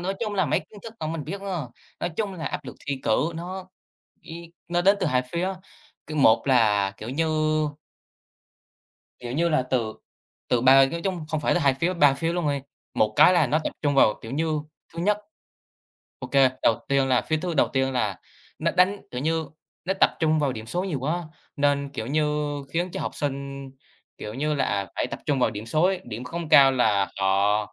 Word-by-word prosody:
nói 190 +2 -2
chung 215 -3 -2
là 190 - +1
mấy - - +1
kiến 205 -2 -15
thức 225 -1 -9
vẫn 155 +1 -2
mình 155 -4 -4
biết 195 +6 -5
à. 180 -9 -4 0.3
Nói 175 - -1
chung 205 -3 -1
là 165 -3 -5
áp 145 - -4
lực - - -8
thi 140 -2 -2
cử 145 +9 +1
nó 185 +2 -6 0.5
ý 170 +1 -10 0.2
nó 175 0 +1
đến 195 +3 +5
từ 185 - +1
2 130 -4 +2
phía, 185 +3 -1 0.5
cứ 155 - -6
một 115 -5 +4
là, 105 -6 +3
kiểu 110 - -7
như 160 +4 0 1.9
kiểu 120 -1 -6
như 170 +6 +1
là, 155 -4 +2
từ 120 -4 -1 0.6
từ 120 - +2
ba 135 +2 +7
nói 170 0 -4
chung 180 -4 -3
không 155 -1 -2
phải 150 - +1
là - - +2
2 140 -3 +4
phía, 165 +7 -1
3 145 -5 +5
phía 165 +5 -2
luôn 175 -3 -1
đi, 140 - -1 0.3
một 110 0 +1
cái 185 - +7
là 160 -5 +3
nó 150 +5 +2
tập - - -2
trung 145 -2 +1
vào, 110 -5 +5
kiểu 115 - -8
như, 155 +1 -1 0.3
thứ 165 - -6
nhất 205 +4 +2 1.0
OK, - - -7 0.3
đầu 115 - +3
tiên 140 -1 +2
là 125 -2 +3
phía 155 - 0
thứ 170 +2 -3
đầu 145 - +3
tiên 135 0 0
là 105 -7 -1 0.4
nó - - +1
đánh, 185 +3 +3
kiểu 125 - -4
như, 160 +1 0 0.4
nó 190 - 0
tập - - +6
trung 155 -1 +3
vào 140 -3 +1
điểm 110 -1 -8
số 180 +9 -2
nhiều 165 -8 -2
quá 165 +6 -2 0.3
nên, 140 0 +1
kiểu 110 -5 -5
như, 150 +1 0 0.2
khiến 175 +2 -1
cho - - -5
học - - -4
sinh, 140 -1 -4 0.5
kiểu 105 +1 -7
như 150 +3 -1
là, 140 - +1
à, 100 -1 -1
phải - - 0
tập - - -7
trung 140 -2 +1
vào 125 - +2
điểm 110 +1 -7
số 155 +7 +1
ấy, 190 0 +2
điểm 120 +1 -7
không 165 +5 -5
cao 135 -2 +7
là 105 -6 +2
họ, 100 +2 +3
150 Hz, 220 wpm, -25 LUFS, 130-170 Hz, 1.9 s, ba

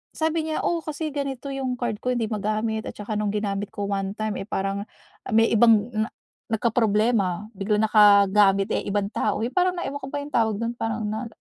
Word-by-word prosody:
sabi 320 0 0
niya, 310 - -1
"Oh, 340 -1 0
kasi 310 0 -4
ganito 275 -1 -4
'yong 260 -2 -2
card 235 -4 -2
ko, 250 - 0
hindi 230 - 0
magamit 215 +1 -1
at - - -10
saka 210 +1 -5
no'ng 210 -1 0
ginamit 205 -1 -2
ko 205 - -3
one 195 0 -2
time, 215 -1 -2
eh, 195 - -6
parang 195 +1 -2 0.5
may 225 +1 +5
ibang 225 0 +5
na 215 +1 -1 0.4
nagkaproblema, 215 -3 +1
biglang 210 +2 0
nakagamit, 200 -2 +5
eh, - - 0
ibang 200 0 -1
tao." 210 -1 -1
yung 245 - -3
parang 365 0 +2
na 350 - -3
ewan 285 +1 -5
ko 265 - -6
ba 290 - -2
yung 295 - -11
tawag 220 -2 +2
do'n 230 +1 -1
parang 225 -1 -2
na 220 +3 -3
220 Hz, 205 wpm, -24 LUFS, 205-245 Hz, 0.5 s, may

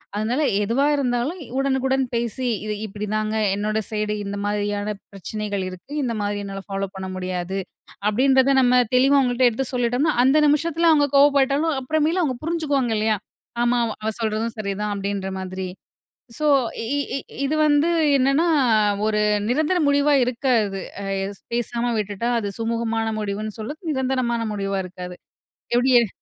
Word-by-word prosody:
அதனால 230 +7 0 0.2
எதுவா 240 +7 +1
இருந்தாலும், 265 +5 -1 0.2
உடனுக்குடன் 265 -1 +1
பேசி, 235 +2 -2 0.2
"இது 210 - -2
இப்பிடிதாங்க. 215 +1 -3 0.2
என்னோட 215 +1 -1
சைடு 210 -1 -1
இந்த 200 0 -4
மாதிரியான 205 0 -1 0.2
பிரச்சனைகள் 200 0 -4
இருக்கு. 185 +9 -12
இந்தமாரி 205 -4 -2
என்னால 195 0 -6
ஃபாலோப் 195 -1 -4
பண்ண 190 0 -5
முடியாது." 185 0 -3 0.5
அப்பிடின்றத 265 +4 +4
நம்ம 250 0 +4 0.2
தெளிவா 270 +3 +5
அவுங்கள்ட்ட 250 -1 +3
எடுத்து 260 +4 -2
சொல்லிட்டம்ன்னா, 245 +5 +1
அந்த 270 +4 +4
நிமிஷத்தில 330 +3 +2
அவுங்க 290 -2 +4
கோவப்பட்டாலும், 280 +2 +4
அப்புறமேலு 315 +6 +1
அவுங்க 260 -6 -1
புரிஞ்சுக்குவாங்க 290 -8 0
இல்லயா! 215 0 +1 0.5
"ஆமா, 240 0 +2 0.2
அவ 220 - -1
சொல்றதும் 220 +1 -1
சரிதான்." 205 0 -2
அப்பிடின்ற 195 -1 -3
மாதிரி. 185 0 -5 0.7
ஸோ 305 -1 0 0.3
இ 275 +6 -1 0.2
இ - - -1 0.3
இது 285 +3 0
வந்து 295 +2 +3 0.3
என்னான்னா, 275 +4 +3 0.6
ஒரு 210 -1 +1 0.3
நிரந்தர 310 +9 +1
முடிவா 285 +1 +3
இருக்காது. 235 -6 0 0.2
அ - - -5 0.2
எஸ் 200 0 -7
பேசாம 240 0 -1
விட்டுட்டா, 210 +2 -2
அது 205 -3 -2
சுமூகமான 225 0 -1
முடிவுன்னு 210 +1 -4
சொல்லத் 295 - -7
நிரந்தரமான 255 -3 0
முடிவா 195 -1 -2
இருக்காது. 180 0 -8 0.6
எப்பிடி 250 +2 +3
எ 230 - 0
235 Hz, 140 wpm, -22 LUFS, 205-275 Hz, 0.7 s, தெளிவா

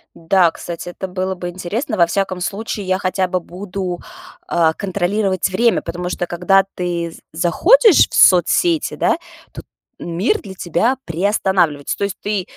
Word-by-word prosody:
Да, 170 +1 +3
кстати, 170 +1 -7
это 190 +2 -6
было 185 +1 -3
бы 175 0 -5
интересно. 210 - -4
Во 170 -1 +4
всяком 190 0 -2
случае, 205 +1 -4
я 185 - +1
хотя 185 0 -1
бы 185 0 -1
буду, 180 0 -6 0.5
а, 160 -2 +2
контролировать 195 0 -1
время, 230 +5 +2
потому 180 0 -5
что, 180 - -2
когда 180 +3 +2
ты 170 -2 -3
з - - -14
заходишь 340 - +5
в - - -6
соцсети, 300 - +4
да, - - +1 0.3
то - - -9 0.4
мир 180 - -1
для 195 -3 -9
тебя 205 +10 0
приостанавливается. 175 -4 0
То 200 - 0
есть 200 - -4
ты, 205 -3 -1
185 Hz, 160 wpm, -18 LUFS, 175-200 Hz, 0.5 s, заходишь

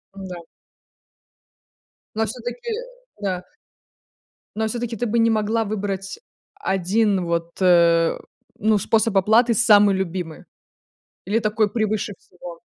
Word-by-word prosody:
М-да. 185 -3 -8 1.7
Но 220 0 +1
всё-таки 245 - -6 0.5
да. 185 -2 -2 1.1
Но 220 0 0
всё-таки 235 0 -3
ты 240 - -2
бы 230 +1 0
не 230 0 +4
могла 220 +1 0
выбрать 200 - -4 0.4
1 195 - 0
вот, 170 0 -2
э, 170 -2 +4 0.4
ну 215 0 +2
способ 220 0 +1
оплаты 225 +5 +4
самый 205 -3 +5
любимый 180 -3 -4 0.8
или 210 +4 0
такой 215 0 +1
превыше 215 -2 -1
всего? 175 -1 -12
205 Hz, 110 wpm, -22 LUFS, 185-225 Hz, 1.7 s, самый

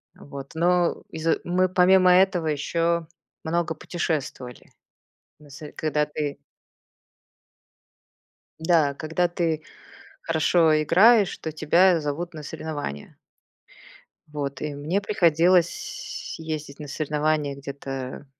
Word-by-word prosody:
Вот. 140 -1 -10
Но 175 +1 +2
из-за 160 0 -1
мы 185 +1 +1
помимо 185 0 +5
этого 180 -3 +3
ещё 165 +3 0 0.4
много 165 0 -1
путешествовали. 150 -7 -4 0.7
Нас, 150 0 -14
э, 150 - -9
когда 150 -1 0
ты 150 -1 -4 2.2
Да. 160 -4 +2
Когда 160 +4 -1
ты 165 -3 -2 0.6
хорошо 160 -1 +3
играешь, 205 +6 +5
то 160 - -5
тебя 170 +3 +3
зовут 160 +4 -4
на 155 - -7
соревнования. 145 - -6 1.1
Вот, 140 -2 -5
и 150 -1 -3
мне 155 +8 -2
приходилось 175 -2 +1
ездить 155 -3 -6
на 150 - -7
соревнования 150 -1 -1
где-то, 135 -1 -7
155 Hz, 100 wpm, -24 LUFS, 145-175 Hz, 2.2 s, помимо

